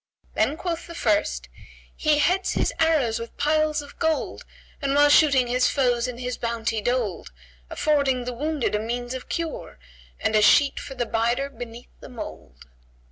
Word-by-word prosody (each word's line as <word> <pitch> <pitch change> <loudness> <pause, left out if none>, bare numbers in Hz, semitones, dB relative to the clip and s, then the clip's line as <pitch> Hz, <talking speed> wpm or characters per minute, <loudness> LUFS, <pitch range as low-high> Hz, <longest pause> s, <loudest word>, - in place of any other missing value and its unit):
Then 300 - +1
quoth 345 -1 -4
the 335 - -9
first, 135 - 0 0.5
"He 305 -1 +2
heads 365 +5 +2
his - - 0
arrows 290 -9 +2
with 230 0 -8
piles 305 0 +1
of 285 - -15
gold, 320 -1 -1 0.2
* - - -28
And 275 -1 0
while 290 0 +6
shooting 280 -4 +5
his 250 +1 +2
foes 245 -3 +1
is 245 -1 -6
his 250 0 -3
bounty 225 -2 -2
doled: 235 - -2 0.4
Affording 275 -5 +1
the 250 - -3
wounded 295 0 -2
a 210 - +1
means 240 +3 -3
of 260 - -7
cure, 330 - -4 0.2
* - - -26
And 220 - +1
a 215 - +5
sheet 280 +6 +5
for 275 -2 -8
the 245 -1 -1
bider 235 +5 0
beneath 240 -2 -9
the - - -11
mould!" 75 - -9
250 Hz, 180 wpm, -24 LUFS, 230-295 Hz, 0.5 s, while